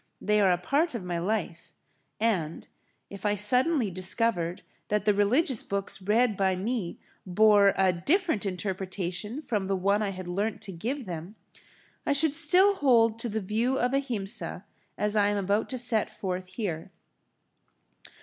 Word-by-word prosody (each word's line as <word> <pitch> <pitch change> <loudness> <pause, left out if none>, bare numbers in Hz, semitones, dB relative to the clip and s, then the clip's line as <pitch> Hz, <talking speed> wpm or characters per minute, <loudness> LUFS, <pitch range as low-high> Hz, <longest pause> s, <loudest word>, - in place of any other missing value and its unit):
They 210 0 +1
are 195 - +4
a 180 - +3
part 280 - 0
of 220 - -4
my 175 -1 -3
life, 180 -2 -3 0.4
and, 185 -8 -1 0.4
if 200 -1 -9
I 210 -1 +1
suddenly 250 - +3
discovered 185 -1 -1 0.2
that 210 -1 -1
the 210 - +4
religious 230 +6 +2
books 200 -1 -2
read 215 +3 +2
by 190 -1 +1
me 200 -1 -3 0.3
bore 200 +1 +4
a 190 -1 +3
different 300 - 0
interpretation 190 - -4
from 205 -8 -2
the 195 - 0
one 200 +3 +1
I 210 - -1
had 185 -2 -7
learnt 200 +5 -2
to 195 - -5
give 240 +10 -4
them, 175 +2 -7 0.7
I - - +1
should 290 +1 +2
still 360 +6 +5
hold 230 - +3
to 235 - 0
the 220 +1 -2
view 225 +7 0
of 250 +1 0
Ahimsa 240 -7 -2 0.3
as 210 0 -1
I 205 -1 +3
am 205 0 0
about 200 +2 0
to 255 - -3
set 235 -3 0
forth 185 -1 -4
here. 185 -6 -5
205 Hz, 160 wpm, -27 LUFS, 185-240 Hz, 0.7 s, still